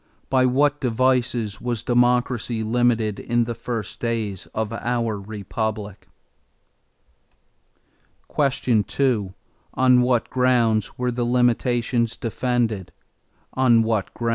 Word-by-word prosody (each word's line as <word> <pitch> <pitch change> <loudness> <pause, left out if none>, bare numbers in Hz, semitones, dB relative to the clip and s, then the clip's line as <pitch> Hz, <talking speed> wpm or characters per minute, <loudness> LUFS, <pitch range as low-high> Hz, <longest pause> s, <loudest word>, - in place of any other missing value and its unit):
By 130 -1 +4
what 145 +3 +2
devices 120 -3 0
was 120 -2 -3
democracy 120 -1 +1
limited 115 -2 +1
in 120 0 0
the 120 0 -3
first 115 -2 -5
days 110 -5 -3
of 110 0 -4
our 115 -2 -2
Republic? 105 0 -5 2.3
2. 125 -5 +1 0.4
On 125 -1 +5
what 125 -1 +1
grounds 120 -4 +1
were 125 0 -1
the 120 0 -2
limitations 120 -1 +1
defended? 115 -5 -1
120 Hz, 90 wpm, -23 LUFS, 110-125 Hz, 2.3 s, On